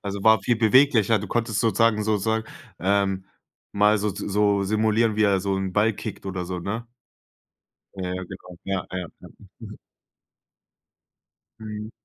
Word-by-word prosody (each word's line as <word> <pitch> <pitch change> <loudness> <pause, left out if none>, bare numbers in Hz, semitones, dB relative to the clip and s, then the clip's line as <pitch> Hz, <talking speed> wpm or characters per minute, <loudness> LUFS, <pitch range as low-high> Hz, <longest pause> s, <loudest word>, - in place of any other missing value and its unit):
Also 100 -1 -5
war 110 -2 +6
viel 120 +2 +1
beweglicher, 115 -1 +4
du 105 - -6
konntest 115 0 -1
sozusagen 115 -2 +2
sozusagen, 110 +1 0 0.3
ähm, 95 0 0 0.5
mal 105 +1 +3
so 105 +1 -1
z 100 - -6
so 100 0 +2
simulieren, 110 +1 +1
wie 110 - +2
er 100 -2 +3
so 100 0 -1
'n 95 -1 -3
Ball 105 +3 +3
kickt 100 - -7
oder 95 -2 -3
so, 90 0 -4
ne? 115 +6 -4 1.1
Ja, 95 - -5
ja, 95 - -4
genau. 90 -1 -11
Ja, 95 -2 -2
ja, 90 -2 -4
ja. - - -12 0.3
Mhm. - - -10 1.8
Mhm. 105 0 -7
105 Hz, 155 wpm, -24 LUFS, 95-110 Hz, 1.8 s, war